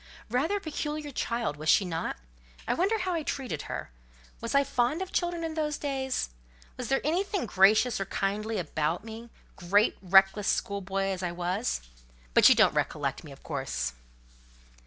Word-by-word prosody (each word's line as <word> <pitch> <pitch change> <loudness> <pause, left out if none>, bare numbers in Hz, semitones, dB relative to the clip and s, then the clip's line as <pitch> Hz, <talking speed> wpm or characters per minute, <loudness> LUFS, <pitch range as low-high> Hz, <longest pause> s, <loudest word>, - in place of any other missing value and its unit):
"Rather 305 +12 +1
a - - -4
peculiar 300 -3 -4
child, 235 - -2
was 155 +1 -2
she 195 - +5
not? 165 - -3 0.5
I - - +2
wonder 395 +6 +1
how 370 -3 -1
I 330 - 0
treated 255 - -3
her. - - -5 0.5
Was 230 +3 -3
I 280 - +6
fond 250 +4 0
of 380 0 -4
children 345 -1 -1
in 325 -1 -3
those 300 -2 -1
days? 265 - -2 0.4
Was 250 - -5
there 270 - +1
anything 365 +2 0
gracious 215 +4 +4
or - - -1
kindly 210 +3 -2
about 160 0 -1
me—great, 220 -3 -1
reckless, 195 +2 +5
schoolboy 195 -1 -1
as 190 -1 -3
I 180 -2 -2
was? 180 +7 -1 0.5
But - - +8
you - - +7
don't - - +5
recollect - - -1
me, - - -11
of - - -14
course?" 60 0 -3
230 Hz, 165 wpm, -29 LUFS, 190-300 Hz, 0.5 s, But